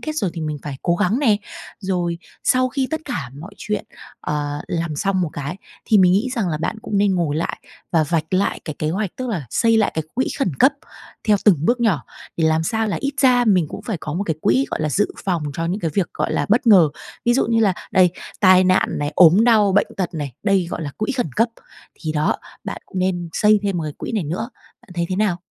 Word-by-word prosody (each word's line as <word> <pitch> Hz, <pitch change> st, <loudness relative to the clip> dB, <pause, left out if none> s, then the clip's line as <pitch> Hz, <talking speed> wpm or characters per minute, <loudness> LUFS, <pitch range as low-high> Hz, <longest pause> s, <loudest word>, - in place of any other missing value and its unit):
kết 310 Hz, -, -3 dB
rồi 195 Hz, -, 0 dB
thì 165 Hz, -, -5 dB
mình 150 Hz, -1 st, -3 dB
phải 145 Hz, -2 st, -5 dB
cố 170 Hz, -, +2 dB
gắng 210 Hz, +9 st, +1 dB
nè. 225 Hz, -8 st, +3 dB, 0.4 s
Rồi 175 Hz, -3 st, -1 dB, 0.3 s
sau 255 Hz, 0 st, +3 dB
khi 270 Hz, -2 st, -1 dB
tất 315 Hz, -, -2 dB
cả 150 Hz, -, -4 dB
mọi 200 Hz, +5 st, -10 dB
chuyện, 210 Hz, 0 st, -3 dB, 0.4 s
ờ, 145 Hz, 0 st, -3 dB
làm 165 Hz, -3 st, -2 dB
xong 195 Hz, +3 st, 0 dB
một 160 Hz, -, -2 dB
cái, 145 Hz, +5 st, -4 dB, 0.3 s
thì 215 Hz, -, +4 dB
mình 180 Hz, -1 st, +5 dB
nghĩ 225 Hz, +7 st, +1 dB
rằng 200 Hz, -6 st, 0 dB
là 155 Hz, -, -1 dB
bạn 170 Hz, +6 st, -3 dB
cũng 205 Hz, -, -1 dB
nên 200 Hz, -2 st, +3 dB
ngồi 155 Hz, -4 st, 0 dB
lại 165 Hz, -, -2 dB, 0.3 s
và 160 Hz, -2 st, +3 dB
vạch 160 Hz, +2 st, -1 dB
lại 195 Hz, +2 st, +1 dB
cái 155 Hz, -, -6 dB
kế 155 Hz, 0 st, -1 dB
hoạch, 195 Hz, +1 st, -2 dB
tức 255 Hz, -1 st, -4 dB
là 170 Hz, -, -3 dB
xây 230 Hz, -1 st, +3 dB
lại 215 Hz, -2 st, +3 dB
cái 160 Hz, -1 st, -2 dB
quỹ 260 Hz, -, 0 dB
khẩn 185 Hz, -, 0 dB
cấp 275 Hz, -, +6 dB, 0.6 s
theo 210 Hz, -, +6 dB
từng 200 Hz, -6 st, +6 dB
bước 245 Hz, +4 st, +2 dB
nhỏ, 175 Hz, -, +1 dB, 0.3 s
thì 165 Hz, -, +1 dB
làm 160 Hz, 0 st, +2 dB
sao 220 Hz, +6 st, 0 dB
là 205 Hz, -, -1 dB
ít 280 Hz, 0 st, -1 dB
ra 250 Hz, -2 st, +5 dB
mình 185 Hz, -7 st, +3 dB
cũng -, -, -8 dB
phải 215 Hz, -6 st, -3 dB
có 150 Hz, 0 st, -5 dB
một 200 Hz, +3 st, -1 dB
cái 160 Hz, -4 st, -2 dB
quỹ, 130 Hz, +4 st, +2 dB
gọi -, -, -2 dB
là, 155 Hz, -, 0 dB
dự 205 Hz, +8 st, +2 dB, 0.2 s
phòng 175 Hz, -5 st, 0 dB
cho 165 Hz, -, -2 dB
những 190 Hz, +5 st, -2 dB
cái 165 Hz, -, -1 dB
việc, 195 Hz, -4 st, +1 dB
gọi -, -, -1 dB
là, -, -, 0 dB
bất 235 Hz, +4 st, +2 dB
ngờ. 185 Hz, -8 st, +7 dB, 0.4 s
Ví 240 Hz, 0 st, +3 dB
dụ 270 Hz, -, +2 dB
như 230 Hz, 0 st, +2 dB
là 200 Hz, -4 st, +4 dB, 0.2 s
đây, 180 Hz, -2 st, +5 dB, 0.3 s
tai 185 Hz, -1 st, +6 dB
nạn 185 Hz, 0 st, +3 dB
này, 145 Hz, +1 st, -2 dB
ốm 180 Hz, +5 st, +6 dB
đau, 215 Hz, -5 st, +4 dB
bệnh 205 Hz, -, +3 dB
tật 180 Hz, -2 st, -2 dB
này, 145 Hz, -5 st, -4 dB
đây 195 Hz, -4 st, +2 dB
gọi 165 Hz, -, -4 dB
là 145 Hz, -, -4 dB
quỹ 215 Hz, +6 st, -1 dB
khẩn 245 Hz, -, -2 dB
cấp. 230 Hz, +1 st, +3 dB, 0.5 s
Thì 155 Hz, -2 st, -3 dB
đó, 150 Hz, 0 st, +1 dB, 0.3 s
bạn -, -, -6 dB
cũng 190 Hz, -, -6 dB
nên 180 Hz, -2 st, -1 dB
xây 210 Hz, -1 st, +4 dB
thêm 200 Hz, -2 st, -1 dB
một 165 Hz, -, -2 dB
cái 150 Hz, -, -4 dB
quỹ -, -, -5 dB
này 205 Hz, -7 st, -1 dB
nữa. 185 Hz, -, -4 dB, 0.3 s
Bạn -, -, -22 dB
thấy 170 Hz, -1 st, -1 dB
thế 185 Hz, -, -2 dB
nào? 195 Hz, -4 st, +1 dB
185 Hz, 255 wpm, -21 LUFS, 160-215 Hz, 0.6 s, ngờ